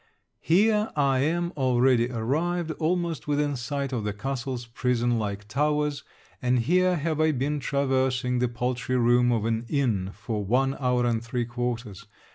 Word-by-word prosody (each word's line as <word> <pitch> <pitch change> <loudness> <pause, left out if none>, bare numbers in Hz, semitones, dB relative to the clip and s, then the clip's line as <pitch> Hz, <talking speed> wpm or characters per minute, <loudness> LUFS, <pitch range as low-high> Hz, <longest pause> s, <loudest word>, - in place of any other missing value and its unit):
Here 210 +5 +3
I 135 -3 +2
am 170 +5 0
already 125 -3 +3
arrived 160 +9 -1
almost 165 -5 -1
within 145 -1 0
sight 140 +2 -3
of 115 -4 -2
the 105 -1 -2
castle's 125 +2 -4
prison 120 0 0
like 100 -1 -4
towers, 150 +3 0 0.4
and 125 -1 +2
here 180 +9 +2
have 155 -1 -1
I 155 0 +4
been 145 +3 -1
traversing 130 -2 0
the 125 - +2
paltry 125 +1 -2
room 120 0 +4
of 115 -2 0
an 115 0 0
inn 115 -10 0
for 110 -3 -4
one 135 +6 +1
hour 125 -2 +1
and 115 -1 0
three 120 +1 -2
quarters. 120 -4 -4
130 Hz, 155 wpm, -26 LUFS, 120-145 Hz, 0.4 s, I